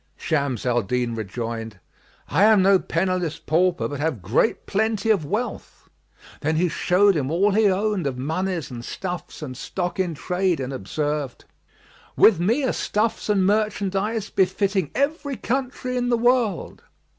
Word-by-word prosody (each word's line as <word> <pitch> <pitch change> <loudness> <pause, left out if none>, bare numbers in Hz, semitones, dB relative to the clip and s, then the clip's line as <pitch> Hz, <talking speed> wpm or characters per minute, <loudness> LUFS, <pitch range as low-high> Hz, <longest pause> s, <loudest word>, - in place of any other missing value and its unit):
Shams 140 -7 -1
al 120 -1 +2
Din 120 +3 -1
rejoined, 115 0 -5 0.5
"I 200 - +4
am 215 -3 +5
no 195 0 +5
penniless 180 -2 -1
pauper 175 +2 +1
but 145 -2 -6
have 145 - -2
great 115 - +1
plenty 220 +1 +1
of 190 -8 +1
wealth;" 225 +8 -4 0.5
then 155 +2 0
he 175 +2 +2
showed 190 +4 +3
him 140 -4 -1
all 190 +6 +2
he 210 +1 +4
owned 195 -3 0
of 130 -2 -3
monies 165 +4 -2
and 120 -1 -7
stuffs 180 +1 -6
and 130 -4 -6
stock 180 +7 -4
in 175 -4 0
trade 180 +1 0
and 130 0 -4
observed, 145 +3 -3 0.7
"With 205 -7 +6
me 225 +11 +1
are 260 - +1
stuffs 215 +1 -1
and 195 -3 +3
merchandise 205 +1 0
befitting 190 -2 +1
every 280 -1 -1
country 255 0 -2
in 245 0 0
the 240 - +3
world." 240 -5 +1
185 Hz, 155 wpm, -23 LUFS, 145-210 Hz, 0.7 s, With